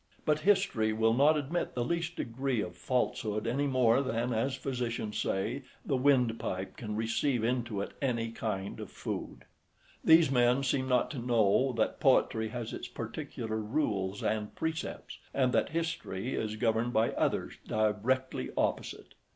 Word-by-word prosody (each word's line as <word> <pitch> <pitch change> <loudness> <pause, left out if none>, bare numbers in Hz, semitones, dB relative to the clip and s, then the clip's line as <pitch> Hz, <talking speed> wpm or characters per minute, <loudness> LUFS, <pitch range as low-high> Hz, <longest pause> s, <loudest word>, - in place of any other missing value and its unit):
But 150 0 +2
history 190 - +2
will 110 +1 +3
not 145 +5 +5
admit 150 +4 -2
the 120 -1 0
least 170 +2 -2
degree 125 +1 -2
of 90 -4 -3
falsehood 110 -4 -1
any 135 +5 0
more 130 -2 +4
than, 120 -2 -1
as 130 +4 0
physicians 120 -5 -3
say, 110 +9 -1 0.2
the 140 - +1
wind 125 -4 +3
pipe 95 +1 -3
{24b} - - -26
can 105 -2 -4
receive 115 +3 0
into 120 -3 -1
it - - -4
any 115 -4 0
kind 100 -4 -4
of - - -6
food. - - -6 0.6
These 160 -3 +6
men 125 +1 +3
seem 130 0 0
not 125 -1 +2
to 140 - -5
know 120 +1 +3
that - - 0
poetry 110 0 +3
has 115 0 -5
its - - -5
particular 110 -2 -5
rules 105 -5 -1
and 105 -1 -1
precepts; 160 0 -4 0.2
and 130 -2 +2
that - - +2
history 160 - -3
is 110 -1 -2
governed 115 +1 +1
by 110 +1 +3
others - - -1
directly 110 +5 0
opposite. - - -2
120 Hz, 160 wpm, -31 LUFS, 110-135 Hz, 0.6 s, These